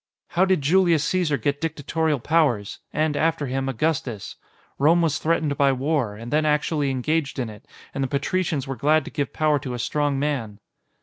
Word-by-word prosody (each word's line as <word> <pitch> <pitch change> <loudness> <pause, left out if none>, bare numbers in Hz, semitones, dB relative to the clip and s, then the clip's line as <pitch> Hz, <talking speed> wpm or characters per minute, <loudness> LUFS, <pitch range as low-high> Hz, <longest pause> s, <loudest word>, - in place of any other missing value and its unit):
"How 180 +2 +3
did 185 -6 +1
Julius 170 0 +3
Caesar 160 -3 +1
get 140 +5 -1
dictatorial 160 -1 -1
powers? 130 -8 +1
And, 155 0 0
after 160 0 +1
him, 135 +1 -2
Augustus? 135 -5 -2 0.4
Rome 165 +5 +4
was 150 -3 +1
threatened 155 -3 0
by 140 -1 +5
war, 130 -5 -1
and 115 +5 -7
then 155 +1 +3
actually 150 -1 +1
engaged 135 +3 -1
in 120 -4 -3
it, 105 - -14 0.3
and 135 - -2
the - - 0
patricians 145 +1 -1
were 135 -1 -4
glad 155 +3 +2
to - - -8
give 145 -2 -2
power 155 -2 +1
to 130 -2 -5
a - - -4
strong 145 +3 0
man." 135 -8 -2
145 Hz, 185 wpm, -23 LUFS, 135-160 Hz, 0.4 s, by